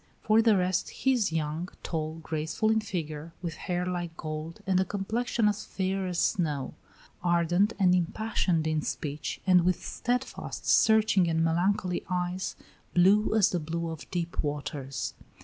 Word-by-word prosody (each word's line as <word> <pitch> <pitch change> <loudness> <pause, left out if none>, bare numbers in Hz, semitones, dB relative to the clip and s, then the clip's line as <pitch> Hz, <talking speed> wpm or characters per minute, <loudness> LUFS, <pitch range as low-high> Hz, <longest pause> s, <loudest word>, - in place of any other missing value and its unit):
For 215 +1 +5
the 220 -3 +4
rest, 180 0 0
he 265 - +1
is 225 -8 +1
young, 160 +2 -2
tall, 155 -1 -3
graceful 160 +8 0
in 220 0 +2
figure, 165 -5 -5
with 170 -2 -2
hair 180 0 -2
like 175 -2 -3
gold 155 +1 -5
and 190 -1 +2
a - - +4
complexion 215 +3 0
as 210 0 0
fair 190 0 -2
as 180 -1 -3
snow; 150 -8 0 0.5
ardent 175 +4 +2
and 185 -3 +4
impassioned 180 -2 0
in 155 -1 +1
speech, 150 0 -4
and 180 -2 +6
with 180 0 0
steadfast, 250 +2 -3
searching, 215 -5 +4
and 165 0 +1
melancholy 180 +2 +1
eyes, 180 0 -2 0.4
blue 200 +5 +5
as 210 -2 +4
the 180 - 0
blue 165 +1 -3
of 160 - -9
deep 170 -2 -2
waters. 140 -2 -3
180 Hz, 155 wpm, -28 LUFS, 160-195 Hz, 0.5 s, and